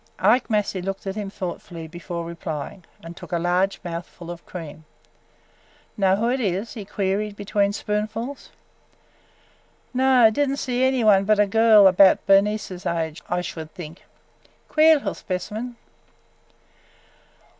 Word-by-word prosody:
Ike 225 Hz, +8 st, +3 dB
Massey 210 Hz, -3 st, 0 dB
looked 195 Hz, +2 st, -5 dB
at 195 Hz, -, -3 dB
him 205 Hz, -2 st, -4 dB
thoughtfully 175 Hz, -3 st, -7 dB
before 170 Hz, 0 st, -6 dB
replying 165 Hz, 0 st, -6 dB, 0.2 s
and 165 Hz, +1 st, -9 dB
took -, -, -12 dB
a 175 Hz, -, +1 dB
large 180 Hz, +3 st, 0 dB
mouthful 170 Hz, 0 st, -7 dB
of 170 Hz, -1 st, -9 dB
cream. 160 Hz, -3 st, -8 dB, 1.1 s
"Know 190 Hz, -2 st, +3 dB
who 220 Hz, +4 st, 0 dB
it 265 Hz, -, 0 dB
is?" 200 Hz, 0 st, -2 dB
he 215 Hz, -5 st, -7 dB
queried 205 Hz, +1 st, -2 dB
between 200 Hz, 0 st, 0 dB
spoonfuls. 215 Hz, +6 st, -4 dB, 1.4 s
"No, 255 Hz, -3 st, +5 dB
did 285 Hz, +5 st, 0 dB
n't 275 Hz, -, -2 dB
see 255 Hz, -2 st, -1 dB
any 260 Hz, -2 st, +2 dB
one 200 Hz, -3 st, +5 dB
but 215 Hz, +1 st, +3 dB
a 210 Hz, -, +5 dB
girl, 220 Hz, 0 st, +6 dB
about 190 Hz, 0 st, +5 dB
Bernice's 195 Hz, -2 st, +2 dB
age, 165 Hz, -1 st, -2 dB
I 175 Hz, 0 st, 0 dB
should 160 Hz, -3 st, -7 dB
think. 165 Hz, -1 st, -9 dB, 0.7 s
Queer 315 Hz, +1 st, +6 dB
little 285 Hz, -, -2 dB
specimen!" 210 Hz, +7 st, -5 dB
195 Hz, 140 wpm, -23 LUFS, 175-220 Hz, 1.4 s, girl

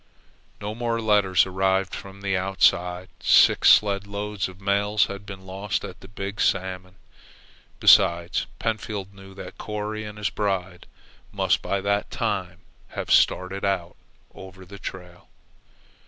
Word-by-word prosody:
No 105 Hz, +1 st, -4 dB
more 115 Hz, 0 st, -2 dB
letters 105 Hz, -5 st, +3 dB
arrived 95 Hz, 0 st, 0 dB
from 100 Hz, 0 st, -9 dB
the 100 Hz, -1 st, -1 dB
outside. 90 Hz, -1 st, +1 dB
Six -, -, +5 dB
sledloads 100 Hz, -1 st, +2 dB
of 95 Hz, 0 st, -13 dB
mails 100 Hz, +1 st, +2 dB
had 100 Hz, +1 st, -8 dB
been 95 Hz, -1 st, -9 dB
lost 95 Hz, +2 st, -3 dB
at -, -, -10 dB
the -, -, -13 dB
Big 100 Hz, +1 st, -5 dB
Salmon. 95 Hz, -1 st, -1 dB, 0.8 s
Besides, 85 Hz, +1 st, +4 dB
Pentfield 105 Hz, -3 st, -3 dB
knew 95 Hz, -1 st, -14 dB
that -, -, -10 dB
Corry 105 Hz, 0 st, -4 dB
and 105 Hz, 0 st, -8 dB
his 105 Hz, -1 st, -2 dB
bride 95 Hz, -4 st, -3 dB, 0.4 s
must -, -, +1 dB
by 100 Hz, -1 st, -2 dB
that 100 Hz, +1 st, 0 dB
time -, -, -3 dB, 0.4 s
have -, -, -3 dB
started 95 Hz, +2 st, +2 dB
in 95 Hz, -3 st, -1 dB, 0.4 s
over 95 Hz, 0 st, -12 dB
the 100 Hz, +2 st, -12 dB
trail. 90 Hz, -1 st, -9 dB
95 Hz, 135 wpm, -24 LUFS, 95-105 Hz, 0.8 s, Six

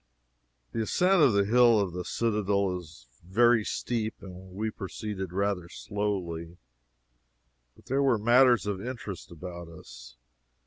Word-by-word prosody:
The 115 Hz, -, -2 dB
ascent 180 Hz, -, +3 dB
of 135 Hz, -7 st, +5 dB
the 100 Hz, 0 st, +3 dB
hill 120 Hz, 0 st, +5 dB
of 95 Hz, -4 st, -1 dB
the 90 Hz, 0 st, -4 dB
citadel 100 Hz, -3 st, 0 dB
is 80 Hz, -7 st, -14 dB, 0.2 s
very 115 Hz, +5 st, +4 dB
steep, 110 Hz, 0 st, -2 dB
and 95 Hz, -1 st, -11 dB
we 110 Hz, +2 st, -2 dB
proceeded 95 Hz, -2 st, -6 dB
rather 95 Hz, -2 st, -1 dB
slowly. 90 Hz, -6 st, -4 dB, 1.2 s
But -, -, -21 dB
there 135 Hz, +2 st, 0 dB
were 135 Hz, -4 st, +3 dB
matters 120 Hz, +2 st, +5 dB
of 100 Hz, -2 st, -3 dB
interest 120 Hz, -7 st, -6 dB
about 85 Hz, +1 st, -8 dB
us. -, -, -13 dB
100 Hz, 135 wpm, -28 LUFS, 90-115 Hz, 1.2 s, of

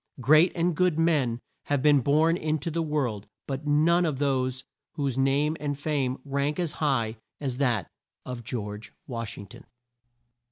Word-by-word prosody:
Great 155 Hz, +7 st, +5 dB
and 170 Hz, -1 st, +1 dB
good 180 Hz, -1 st, +2 dB
men 145 Hz, -8 st, +2 dB, 0.3 s
have 145 Hz, -2 st, 0 dB
been 145 Hz, -2 st, +6 dB
born 155 Hz, +5 st, +3 dB
in 155 Hz, -2 st, -1 dB
to 155 Hz, +3 st, -4 dB
the 165 Hz, +2 st, -1 dB
world, 135 Hz, -10 st, -2 dB, 0.2 s
but 140 Hz, +2 st, -5 dB
none 160 Hz, +4 st, +4 dB, 0.9 s
whose 140 Hz, -5 st, -2 dB
name 140 Hz, +3 st, +2 dB
and 145 Hz, -1 st, -2 dB
fame 140 Hz, -3 st, -1 dB
rank 140 Hz, +1 st, -1 dB
as 175 Hz, -4 st, -1 dB
high 120 Hz, -8 st, 0 dB, 0.2 s
as 130 Hz, -4 st, -3 dB
that 120 Hz, -, +1 dB, 0.4 s
of 125 Hz, -2 st, -6 dB
GEORGE 105 Hz, -2 st, -6 dB
WASH 115 Hz, -4 st, -5 dB
ING 100 Hz, -, -8 dB
TON. 100 Hz, -, -13 dB
145 Hz, 155 wpm, -27 LUFS, 125-155 Hz, 0.9 s, been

